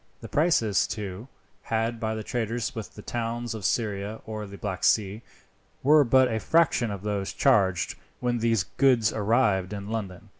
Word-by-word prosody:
The - - -7
prices, 130 - +2
too, 105 +1 -6 0.4
asked 115 +1 0
by 110 -1 -2
the 110 - -5
traders 115 0 -2
with 110 -2 -7
the 105 - -10
towns 120 0 -3
of 110 -3 -7
Syria 105 -1 -1
or 110 -1 -5
the 100 0 -10
Black 95 -3 -5
Sea, 105 0 +2 0.6
were 150 +2 +6
but 130 +1 +4
a 110 - 0
fraction 155 -4 +2
of 100 -1 -6
those 100 -2 -2
charged 100 -10 +2 0.3
when 120 -1 0
these 115 -3 +2
goods 125 -6 +4
arrived 105 -3 +1
in 100 0 -6
London. 105 -3 -5
110 Hz, 165 wpm, -26 LUFS, 100-120 Hz, 0.6 s, were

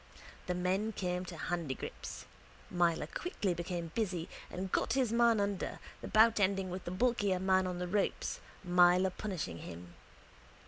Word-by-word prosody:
The 180 - 0
men 190 +5 0
came 180 -1 -2
to 175 -2 -8
handigrips. 165 -5 -4 0.5
Myler 170 -3 +2
quickly 205 - -2
became 170 -1 -4
busy 180 -7 -1 0.2
and 185 +1 -4
got - - +1
his 250 -4 +2
man 235 -2 +5
under, 200 -2 -1 0.2
the - - -5
bout 220 0 +5
ending 195 -1 +1
with 185 +1 -5
the - - -3
bulkier 205 -1 +1
man 190 0 +3
on 180 -1 -3
the 180 0 -3
ropes, 200 +2 -1 0.2
Myler 180 +1 +5
punishing 180 - -4
him. 85 0 -9
185 Hz, 150 wpm, -33 LUFS, 175-205 Hz, 0.5 s, man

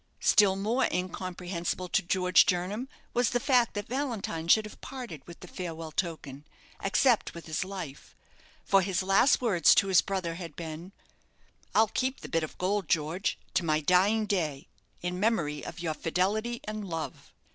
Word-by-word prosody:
Still 200 -2 +5
more 225 +7 +1
incomprehensible 180 0 -3
to - - +2
George 180 +1 +4
Jernam 190 +8 -1 0.3
was 245 -1 +2
the 245 - 0
fact 250 -4 +2
that 205 - -3
Valentine 230 - -3
should 215 +5 +5
have 215 - -11
parted 245 - -7
with 170 - -12
the 180 - -9
farewell 165 -3 -6
token, 150 -5 -4 0.4
except 225 +3 +2
with 170 - -9
his 155 +1 -2
life, 185 -8 -8 0.5
for 195 - +4
his 185 -1 -1
last 195 +9 +4
words 200 -9 +5
to 195 - +3
his 185 - +6
brother 185 -4 -3
had 165 -3 -8
been 165 +2 -7 0.8
"I'll 220 +1 +6
keep 260 +1 -2
the - - -8
bit 165 - +1
of 155 - -6
gold, 190 0 -1
George, 165 +3 0 0.2
to 185 - +1
my 155 -2 +2
dying 190 +7 +3
day, 160 -9 -2 0.4
in 180 +1 -2
memory 170 -9 0
of 170 - -7
your 165 -2 -1
fidelity 205 +9 -1
and 215 0 -5
love." 165 -4 -6
185 Hz, 170 wpm, -29 LUFS, 165-215 Hz, 0.8 s, his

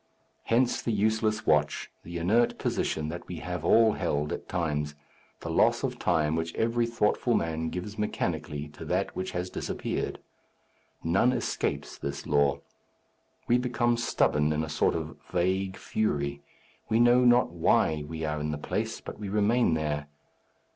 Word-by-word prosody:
Hence 120 +2 +2
the 115 - -1
useless 110 +1 +1
watch, 75 -1 +1
the 85 +1 -6
inert 110 +8 +2
position 75 -1 -1
that 85 +2 -7
we 90 - -5
have 90 0 -5
all 115 +5 +5
held 75 +1 -1
at - - -7
times, 75 -4 -1 0.5
the - - -5
loss - - +3
of - - -2
time 75 0 +2
which 80 0 -3
every 115 +1 +1
thoughtful 115 +1 +1
man 80 0 -1
gives 100 +5 -6
mechanically 75 -7 -2
to 75 - -11
that - - -1
which 95 - -3
has 90 +1 -3
disappeared. - - -3 0.9
None 95 +9 +3
escapes 125 - -2
this 70 0 -5
law. 70 -1 +2 0.9
We 120 +1 +4
become 120 -1 +1
stubborn 75 -10 +2
in 75 +1 0
a 80 - -5
sort - - +1
of - - -4
vague 95 +2 0
fury. 70 -9 -1 0.5
We 110 - +3
know 120 +1 +6
not 120 -5 +5
why 80 -2 +2
we 80 0 -4
are 75 0 -2
in 75 +1 -2
the 75 - -2
place, 75 - -3
but - - -8
we 105 -2 -5
remain 105 -2 +3
there. 75 -1 -2
90 Hz, 160 wpm, -28 LUFS, 75-110 Hz, 0.9 s, know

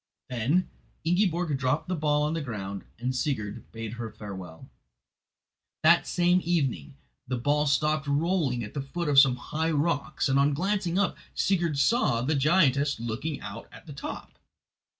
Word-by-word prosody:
Then 130 +10 +1 0.4
Ingiborg 175 -2 +1
dropped 130 +6 0
the 185 - -1
ball 150 -2 +1
on 150 +1 0
the 165 - -2
ground, 100 -7 -5
and 125 +2 -2
Sigurd 125 -6 -3
bade 115 -1 -6
her 115 - -4
farewell. 95 -6 -9 1.2
That 170 +2 +5
same 180 +1 +3
evening 135 - -1 0.3
the 125 0 -1
ball 145 +4 +1
stopped 150 +1 +1
rolling 145 -4 +1
at 105 - -8
the 140 - -2
foot 170 +5 -4
of 140 -2 +6
some 135 -3 +6
high 160 +6 -2
rocks, 150 -3 0
and 135 0 +3
on 140 +1 +3
glancing 185 +1 0
up, 200 -2 +1 0.2
Sigurd 170 -6 +1
saw 140 - +2
the 150 +5 +1
giantess 140 -2 +3
looking 120 +6 -4
out 105 +3 -8
at - - -14
the 150 - -9
top. 140 - -8
145 Hz, 160 wpm, -27 LUFS, 125-165 Hz, 1.2 s, of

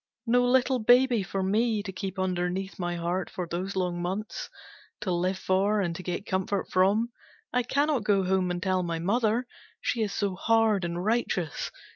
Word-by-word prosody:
No 245 +1 +4
little 255 +1 +3
baby 245 0 +5
for 190 0 -3
me 215 +2 +1
to 195 - -5
keep 190 +1 -5
underneath 185 +1 -2
my 175 -1 -2
heart 175 +2 -2
for 180 -2 -4
those 185 +4 -3
long 180 -2 -1
months. 190 +5 -4 0.5
To 185 - -1
live 180 +2 0
for 195 +3 +1
and 175 -4 -1
to 185 - -6
get 180 +2 -4
comfort 190 +1 -1
from. 205 +6 +3 0.4
I 250 - +3
cannot 280 0 +1
go 200 -2 +3
home 185 0 +1
and 175 0 -2
tell 185 -1 +1
my 170 -2 -2
mother. 220 +7 +1 0.3
She 235 - -1
is 210 -2 0
so 200 -2 -1
hard 220 -1 +2
and 170 +2 -3
righteous. 210 - 0
195 Hz, 180 wpm, -28 LUFS, 180-225 Hz, 0.5 s, baby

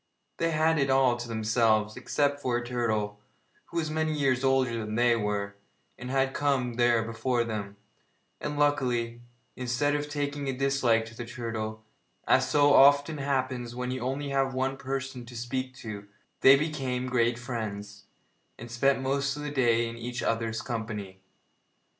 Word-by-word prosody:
They 165 - +1
had 160 0 +2
it 135 -1 +1
all 130 -2 +4
to 120 0 -6
themselves, 110 -1 +1
except 145 -1 0
for 125 -4 0
a 120 - -4
turtle, 110 -4 -1 0.5
who 170 - -7
was 155 -2 -1
many 155 0 0
years 135 -3 +1
older 130 -3 +2
than 110 -1 -4
they 120 0 +4
were, 100 -2 -2 0.4
and 125 0 -8
had 135 0 +1
come 135 -4 0
there 120 -1 +3
before 115 +2 -1
them, 105 -3 -5 0.6
and, 150 0 -4
luckily, 125 -5 +1 0.3
instead 130 +4 0
of 145 0 -2
taking 145 -1 -3
a 135 - 0
dislike 130 -4 +2
to 115 0 -12
the 120 - -5
turtle, 115 -3 -5 0.4
as - - +4
so 145 -1 +5
often 145 +2 +5
happens 130 -3 -2
when 125 0 -3
you 130 - -3
have 125 - -2
only 140 +1 -3 0.2
one 135 +1 0
person 135 -1 -4
to 120 -1 -9
speak 130 +2 -3
to, 105 -5 -8 0.3
they 135 - +8
became 135 -4 -2
great 120 -2 +1
friends, 105 -4 -6 0.5
and 120 0 -9
spent 135 +3 +2
most 140 +1 0
of 150 - -6
the 150 - -4
day 120 -4 +2
in 115 0 -7
each 120 0 -5
other's 115 -1 -1
company. 105 -5 -5
125 Hz, 165 wpm, -28 LUFS, 115-140 Hz, 0.6 s, they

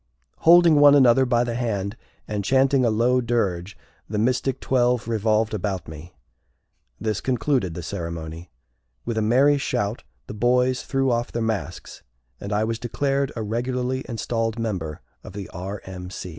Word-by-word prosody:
Holding 170 -2 +6
one 145 0 +8
another 130 -1 +5
by 120 -1 +2
the 120 -1 -3
hand, 110 -4 -2 0.3
and 105 -1 -3
chanting 135 +3 +3
a 120 - +3
low 120 +4 +2
dirge, 100 -6 -1 0.3
the 105 - -3
Mystic 125 +3 0
Twelve 125 -2 +1
revolved 110 -1 +1
about 100 -2 -3
me. 80 +2 -11 0.8
This 110 0 -2
concluded 125 - 0
the 85 - -6
ceremony. 85 0 -6 0.6
With 115 -2 -1
a - - 0
merry 135 +6 +4
shout 105 -4 -2 0.2
the - - -8
boys 125 +3 +2
threw 135 -1 0
off 120 0 -1
their 115 - -2
masks, 110 -2 -4 0.4
and 100 - -6
I 105 +1 +1
was 115 +1 -2
declared 135 +3 -1
a 115 - -3
regularly 125 +4 -2
installed 115 -1 -2
member 95 -10 -4 0.2
of - - -10
the 100 -2 -6
R. 95 +4 -6
M. 90 -1 -8
115 Hz, 155 wpm, -23 LUFS, 100-125 Hz, 0.8 s, one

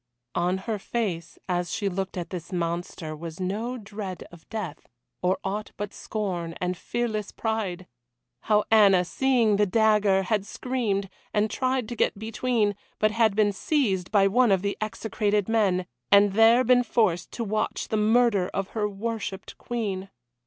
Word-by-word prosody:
On 180 +2 +1
her 220 -2 -2
face, 195 -6 -3
as 175 -1 -1
she 205 - -1
looked 190 0 -3
at 175 -1 -5
this 175 -3 -6
monster, 170 -2 -3
was 165 +2 -8
no 215 +7 -2
dread 200 -4 -6
of 170 -2 -16
death, 210 -8 -6 0.3
or 180 +1 +2
aught 205 +2 -3
but 205 0 -4
scorn 180 -6 -3
and 180 0 -1
fearless 215 +1 -3
pride. 205 -5 -2 0.6
How 210 -1 +4
Anna, 200 -5 +6
seeing 235 -1 +2
the 205 0 +3
dagger, 210 -2 +3
had 205 +1 0
screamed, 215 -3 -2 0.3
and 210 0 +2
tried 255 -2 0
to 240 - -4
get 220 - +1
between, 220 -1 0 0.2
but 215 0 +2
had 220 -2 +2
been 210 -1 +3
seized 195 - 0
by 200 -2 +5
one 240 +2 +4
of 190 -1 +2
the 200 0 -1
execrated 210 -1 -1
men, 200 -5 +2 0.3
and 200 0 +6
there 225 +4 +6
been 250 0 +5
forced 215 -7 +1
to 235 - -3
watch 215 0 -2
the - - 0
murder 215 -3 +3
of 195 -1 -2
her 210 -2 -1
worshipped 205 -1 -5
Queen. 200 -5 -3
205 Hz, 160 wpm, -26 LUFS, 185-225 Hz, 0.6 s, Anna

